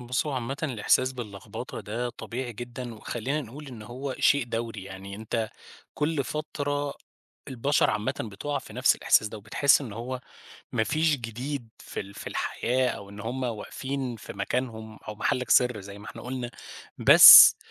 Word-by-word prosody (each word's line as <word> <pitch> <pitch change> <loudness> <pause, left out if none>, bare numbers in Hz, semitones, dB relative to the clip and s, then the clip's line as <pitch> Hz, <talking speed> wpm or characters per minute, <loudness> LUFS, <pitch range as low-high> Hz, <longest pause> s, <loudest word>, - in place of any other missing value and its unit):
بص، 125 +4 -2
هو 150 - -2
عامةً 130 +1 -3
الإحساس 130 -1 +1
باللخبطة 105 -6 -7
ده 120 +4 -4
طبيعي 120 +1 -6
جدًا، 120 +1 -7
وخلّينا 120 +6 -3
نقول 145 +3 -10
إن 120 -4 -10
هو 130 +5 -6
شيء 140 -4 +3
دوري. 115 -4 -5
يعني 95 +1 -9
أنت 110 +1 -3 0.5
كل 150 -2 -1
فترة 145 -1 -3 0.5
البشر 135 +3 +1
عامةً 105 +2 -2
بتُقع 115 +7 -4
في - - -12
نفس - - +3
الإحساس 110 - +3
ده، 110 - -8
وبتحسّ 115 +9 +3
إن 125 -7 -7
هو 125 +4 -5 0.5
ما 110 -3 +1
فيش 155 +3 +1
جديد 120 +2 -5
في - - -7
ال 100 0 -9
في - - -10
ال - - -4
الحياة، 125 +2 0
أو 100 -4 -6
إن 100 0 -10
هم 120 +5 -4
واقفين 125 +2 -4
في - - -10
مكانهم، 110 +1 -4
أو 105 - -4
محلّك 125 +3 -1
سر 125 -4 +4
زي 100 +1 -10
ما 105 - -12
إحنا - - -9
قلنا. 125 -1 -5 0.5
بس - - +11
120 Hz, 170 wpm, -27 LUFS, 110-135 Hz, 0.5 s, بس